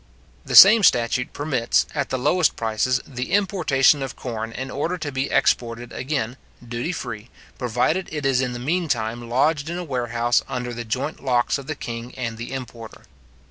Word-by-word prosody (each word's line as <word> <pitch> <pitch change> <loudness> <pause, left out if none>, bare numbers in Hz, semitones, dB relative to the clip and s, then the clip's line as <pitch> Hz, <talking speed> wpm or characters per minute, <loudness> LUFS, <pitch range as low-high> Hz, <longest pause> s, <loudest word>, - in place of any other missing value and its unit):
The - - -3
same 215 +3 +10
statute 125 -6 +2
permits, 135 -6 0
at 140 -3 -2
the 130 - -1
lowest 165 +6 +2
prices, 115 +3 0
the 125 +2 -6
importation 160 -9 +3
of 135 - -5
corn 115 -2 -5
in 130 +3 -6
order 165 +6 -2
to 155 -4 -5
be 135 +1 -2
exported 120 0 0
again, 130 -3 -3 0.3
duty 120 +8 -3
free, 110 -9 -6 0.3
provided 125 +9 0
it 150 -2 -4
is 135 -1 +2
in 125 -2 -2
the - - -5
mean 165 +8 -1
time 120 -3 -2
lodged 145 +5 +1
in 170 - -3
a 180 - -4
warehouse 120 -4 0
under 125 -1 -4
the 120 0 -6
joint 130 +8 -3
locks 125 +1 +1
of 140 - -11
the 155 - -3
king 115 -2 -7
and 115 -3 -4
the 120 - -6
importer. 120 -4 -8
130 Hz, 180 wpm, -22 LUFS, 120-145 Hz, 0.3 s, same